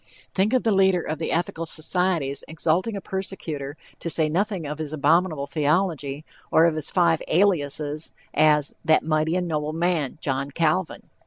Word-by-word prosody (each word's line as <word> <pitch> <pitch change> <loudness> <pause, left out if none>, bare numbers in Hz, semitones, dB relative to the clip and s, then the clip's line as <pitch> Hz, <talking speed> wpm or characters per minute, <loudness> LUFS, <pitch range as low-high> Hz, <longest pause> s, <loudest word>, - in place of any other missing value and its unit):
Think 200 +4 +1
of 255 - +2
the 225 - +2
leader 190 -2 +3
of 155 0 -4
the 165 - -2
Ethical 165 0 -2
Societies 160 -3 0
exalting 170 +7 0
a - - -6
persecutor, 160 -8 -4 0.2
to 170 - -4
say 155 -1 +1
nothing 190 +1 -1
of 150 +1 -5
his 155 -1 -4
abominable 155 0 +2
theology, 150 0 -1 0.3
or 160 - +6
of 170 - +3
his 155 -2 -3
five 170 -3 +2
aliases, 155 -4 +1 0.2
as 150 -1 +3
"that 155 -1 +3
mighty 155 +1 +1
and 180 -1 -1
noble 155 -1 -2
man; 165 -5 0
John 140 -2 -2
Calvin!" 160 +4 0
160 Hz, 165 wpm, -24 LUFS, 150-180 Hz, 0.3 s, or